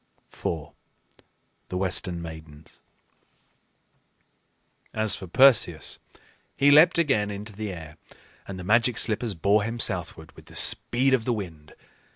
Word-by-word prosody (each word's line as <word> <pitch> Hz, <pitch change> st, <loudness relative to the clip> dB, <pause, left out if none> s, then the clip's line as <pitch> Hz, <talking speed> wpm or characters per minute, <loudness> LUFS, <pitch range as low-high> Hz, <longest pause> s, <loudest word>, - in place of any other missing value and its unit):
IV. 80 Hz, -3 st, -5 dB, 1.0 s
THE 90 Hz, -, -4 dB
WESTERN 90 Hz, -2 st, -1 dB
MAIDENS. 80 Hz, -2 st, -12 dB, 2.2 s
As 110 Hz, -1 st, +1 dB
for 95 Hz, -, -9 dB
Perseus, 115 Hz, -, +3 dB, 0.6 s
he 140 Hz, +1 st, +4 dB
leaped 155 Hz, +5 st, +6 dB
again 120 Hz, -11 st, +1 dB
into 105 Hz, +1 st, -7 dB
the 105 Hz, 0 st, -5 dB
air, 80 Hz, -4 st, -10 dB, 0.5 s
and 95 Hz, -, -7 dB
the 90 Hz, -, -8 dB
Magic 115 Hz, +4 st, +2 dB
Slippers 110 Hz, -1 st, 0 dB
bore 100 Hz, +6 st, +2 dB
him 115 Hz, +3 st, -4 dB
southward 90 Hz, -7 st, 0 dB
with -, -, -18 dB
the -, -, -14 dB
speed 130 Hz, +3 st, +2 dB
of 120 Hz, -4 st, +1 dB
the 125 Hz, -, 0 dB
wind. 80 Hz, -8 st, -8 dB
100 Hz, 130 wpm, -25 LUFS, 85-115 Hz, 2.2 s, leaped